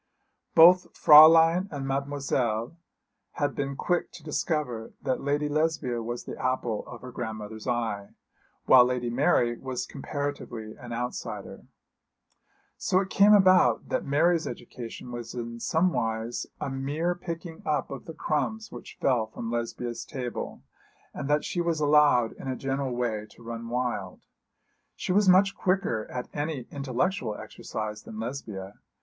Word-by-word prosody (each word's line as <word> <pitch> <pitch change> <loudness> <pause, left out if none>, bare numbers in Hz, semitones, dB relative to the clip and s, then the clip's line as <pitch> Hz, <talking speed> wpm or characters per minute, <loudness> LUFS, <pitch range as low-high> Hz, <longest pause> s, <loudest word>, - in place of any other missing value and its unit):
Both 180 +3 +7
Fräulein 165 +4 +8
and 140 -2 -4
Mademoiselle 135 -3 -1 0.6
had 145 -1 -1
been 140 -1 -3
quick 175 +5 -1
to 165 - -12
discover 150 -7 -2
that 130 -2 -1
Lady 145 +1 0
Lesbia 150 -5 0
was 120 +1 -5
the - - -7
apple 125 -4 -1
of 120 - -10
her 125 - -9
grandmother's 110 -2 -6
eye, 115 -5 -2 0.5
while 130 -1 +8
Lady 125 -1 -1
Mary 120 -3 +2
was 130 -2 -4
comparatively 140 -6 -5
an 120 -1 -10
outsider. 120 +1 -5 1.1
So 185 - +2
it 190 0 -3
came 205 +1 +6
about 185 - +5
that - - 0
Mary's 160 +4 +2
education 120 0 -8
was 120 -1 -6
in 115 -1 -5
somewise 120 -9 0
a 135 - -3
mere 145 +6 -1
picking 170 -1 -7
up 150 - -1
of 135 - -7
the 165 - -8
crumbs 220 +10 -2
which - - -10
fell 120 -5 +2
from 115 +1 -6
Lesbia's 120 0 -3
table, 125 - -6 0.5
and 140 - -5
that 150 0 +2
she 175 - -1
was 170 -2 0
allowed 145 -6 +4
in - - -10
a 130 - -1
general 135 -1 -2
way 110 -4 -2
to 120 - -17
run 115 0 -6
wild. 120 -6 -3 0.7
She - - -3
was 200 +1 +4
much 195 +2 +5
quicker 185 - 0
at 125 -1 -5
any 145 -4 -3
intellectual 135 - -1
exercise 105 0 -6
than 110 - -9
Lesbia. 110 -6 -6
135 Hz, 145 wpm, -27 LUFS, 120-155 Hz, 1.1 s, Fräulein